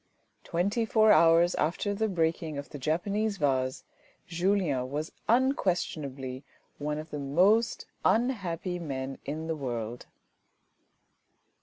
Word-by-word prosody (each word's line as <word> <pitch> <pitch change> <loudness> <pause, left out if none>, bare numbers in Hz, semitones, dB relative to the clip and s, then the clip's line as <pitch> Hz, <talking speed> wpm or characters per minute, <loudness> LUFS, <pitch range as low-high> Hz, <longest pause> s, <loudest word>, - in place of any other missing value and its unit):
Twenty 195 +7 0
four 220 -2 +4
hours 170 -1 +6
after 170 +6 0
the 220 +2 0
breaking 165 -4 -1
of 140 - -6
the 145 - -8
Japanese 200 +9 0
vase, 130 -4 0 0.4
Julien 175 -7 0
was 150 +3 -3 0.2
unquestionably 155 - 0 0.4
one 150 +1 -2
of 155 +1 -7
the 150 - -4
most 185 +12 +2 0.2
unhappy 190 -7 0
men 135 -4 -5
in 155 +3 -4
the 160 0 -2
world. 120 -4 -4
165 Hz, 115 wpm, -29 LUFS, 140-200 Hz, 0.4 s, hours